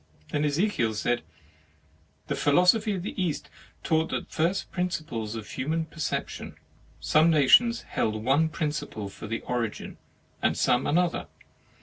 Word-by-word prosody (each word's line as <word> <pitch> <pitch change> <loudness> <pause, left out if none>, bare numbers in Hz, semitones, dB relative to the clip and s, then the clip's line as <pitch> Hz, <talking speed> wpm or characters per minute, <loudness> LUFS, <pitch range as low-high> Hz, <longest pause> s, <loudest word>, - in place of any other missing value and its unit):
Then 145 - 0
Ezekiel 145 - +1
said: 120 +3 0 0.5
" 80 -1 -36
The - - -1
philosophy 180 +8 +3
of 180 - -4
the 190 - -4
East 160 -5 -3 0.3
taught 160 0 +1
the - - -2
first 170 +4 -1
principles 155 - -3
of 110 -2 -6
human 160 +5 -2
perception; 160 -1 -4 0.4
some 155 +2 +4
nations 200 - +5
held 110 - -1
one 145 +6 +3
principle 150 -10 -3
for 105 - -9
the 115 +2 -3
origin, 120 -3 -4 0.4
and - - +1
some 125 +1 +2
another. 175 +2 +1
150 Hz, 135 wpm, -27 LUFS, 115-170 Hz, 0.5 s, nations